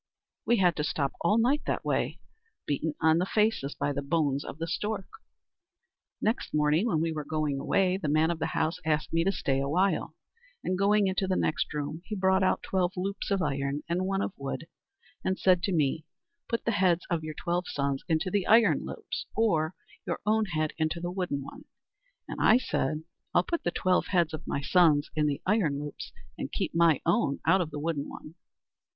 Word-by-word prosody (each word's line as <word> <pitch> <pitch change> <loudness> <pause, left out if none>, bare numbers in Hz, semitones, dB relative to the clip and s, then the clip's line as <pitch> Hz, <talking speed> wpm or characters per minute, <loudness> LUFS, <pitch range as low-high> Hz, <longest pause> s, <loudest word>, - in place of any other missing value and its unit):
"We 240 - +4
had 180 -4 +3
to 150 - 0
stop 140 -2 -1
all 205 +6 +3
night 260 +6 +3
that - - -1
way, - - -1 0.5
beaten 150 +2 -1
on 160 +1 +5
the 180 - +1
faces 210 -11 +1
by 145 - -1
the 140 - -2
bones 140 -1 0
of - - -8
the 165 - -3
stork. 195 +3 -2 1.1
"Next 220 -7 -1
morning, 150 +7 +3
when 160 -8 +1
we 165 0 0
were 155 -1 -4
going 150 -2 -1
away, 185 +5 +2
the 175 - -4
man 155 +3 +3
of 165 - -4
the - - 0
house 160 +1 0
asked 155 0 0
me 165 0 +3
to 195 - +2
stay 135 -7 0
a 140 0 -1
while; 185 +6 +1 0.5
and 185 - 0
going 200 +2 +3
into 190 0 0
the 185 - +1
next 155 - 0
room, 150 +2 -4
he 215 - -4
brought 190 0 +3
out 185 - +1
twelve 185 -1 0
loops 195 +2 -3
of 195 -2 +1
iron 140 0 -1
and 180 +2 -1
one 195 0 0
of - - -3
wood, 140 +3 -5 0.6
and 190 0 0
said 180 -2 +4
to 195 - -1
me: 155 -2 +1 0.5
'Put 230 - -2
the 230 - +2
heads 180 -4 +2
of 165 -2 0
your 155 -1 -5
twelve 175 +3 -1
sons 140 -1 -2
into 165 +3 0
the 200 -2 0
iron 225 +1 +5
loops, - - -6
or 175 -7 +1 0.3
your - - -1
own 220 +1 +3
head 155 -5 -1
into 155 +2 0
the 175 +1 -3
wooden 180 -7 -2
one'; - - -11 0.6
and - - -5
I 220 - +6
said: 155 - -1 0.3
'I'll 175 - +5
put 340 - -2
the - - +1
twelve 185 +1 +1
heads 170 -4 +1
of 155 - -7
my 140 - -1
sons 155 -1 +3
in 150 -1 +2
the 140 -1 -2
iron 180 -9 +2
loops, 145 0 -7 0.3
and - - -4
keep - - -2
my 165 -3 +4
own 140 - +2
out 190 - +4
of 165 - -2
the 150 - -7
wooden 150 -1 -2
one.' 155 - -10
170 Hz, 205 wpm, -28 LUFS, 150-190 Hz, 1.1 s, I